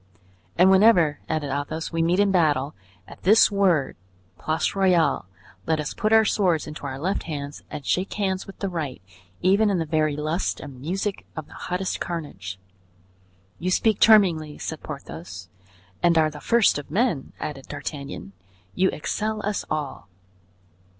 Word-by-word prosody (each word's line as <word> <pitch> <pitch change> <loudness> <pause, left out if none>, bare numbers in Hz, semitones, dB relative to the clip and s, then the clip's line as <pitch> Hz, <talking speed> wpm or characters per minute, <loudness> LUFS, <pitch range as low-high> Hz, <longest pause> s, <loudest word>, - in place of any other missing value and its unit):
"And 185 +2 +6
whenever," 190 -7 +5
added 155 -3 -1
Athos, 145 +3 -3
"we 165 -1 0
meet 170 +3 +2
in 205 -1 +4
battle, 150 -5 +2 0.3
at - - -13
this 215 +4 +6
word, 185 -8 +2 0.4
'Place 160 +1 0
Royale!' 180 - +2 0.4
let 160 -1 +1
us 150 - -3
put 215 - -1
our 220 0 +6
swords 180 -6 +1
into 150 -1 -7
our 130 -1 -5
left 185 +8 -1
hands 145 -1 -5
and 145 - -7
shake 185 +2 0
hands 190 -2 -2
with 195 - -11
the 200 - -2
right, 155 - -4 0.4
even 200 +4 +4
in 195 - +1
the 165 - -1
very 155 -1 +1
lust 155 +4 -2
and 135 -4 -10
music 190 +6 -3
of 160 - -5
the - - -16
hottest 185 +1 -3
carnage." 100 - -5 1.0
"You 180 - -1
speak 215 +3 +2
charmingly," 175 -9 +5
said - - -5
Porthos. 90 +5 -8 0.5
"And 170 -1 +4
are 155 -1 +3
the 150 - -10
first 235 -9 +3
of 145 - -10
men!" 190 - 0
added 135 -3 -6
D'Artagnan. 140 -6 -6 0.4
"You 190 0 +2
excel 215 +7 -3
us 210 0 -2
all." 150 -3 -4
165 Hz, 160 wpm, -24 LUFS, 145-195 Hz, 1.0 s, And